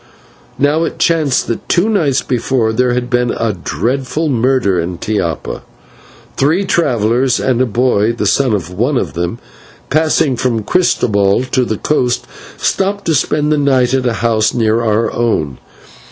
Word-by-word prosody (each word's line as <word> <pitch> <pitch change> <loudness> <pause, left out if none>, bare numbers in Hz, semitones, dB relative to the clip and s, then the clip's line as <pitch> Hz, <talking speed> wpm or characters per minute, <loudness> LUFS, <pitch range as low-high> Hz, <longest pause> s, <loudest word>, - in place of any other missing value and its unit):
Now, 145 +3 +2
it - - -3
chanced 155 -6 +1
that 115 - -5
two 180 +4 +2
nights 155 -12 +1
before 120 -2 0
there 125 +1 +1
had 125 0 -2
been 120 -1 0
a 115 -2 -1
dreadful 130 - -2
murder 120 -7 +1
in 85 +1 -3
Tiapa. 85 -5 -3 0.8
Three 160 +8 +2
travellers 125 - +1
and 130 -2 +1
a 130 - +2
boy, 115 -2 +1
the 115 - -3
son 125 +5 +2
of 90 -3 -5
one 120 +9 0
of - - -2
them, 85 +5 -3 0.5
passing 155 -3 +2
from 125 -1 0
San 110 - -3
Christobel 100 - +2
to 130 - +2
the 110 -2 -2
coast, 125 -3 0 0.3
stopped 200 +1 -1
to 165 - +1
spend 150 +2 +1
the 150 - +2
night 130 -3 +2
at 130 -1 +1
a 120 - 0
house 110 -1 +1
near 115 -1 +1
our 110 0 0
own. 80 - -1
125 Hz, 165 wpm, -15 LUFS, 110-140 Hz, 0.8 s, Now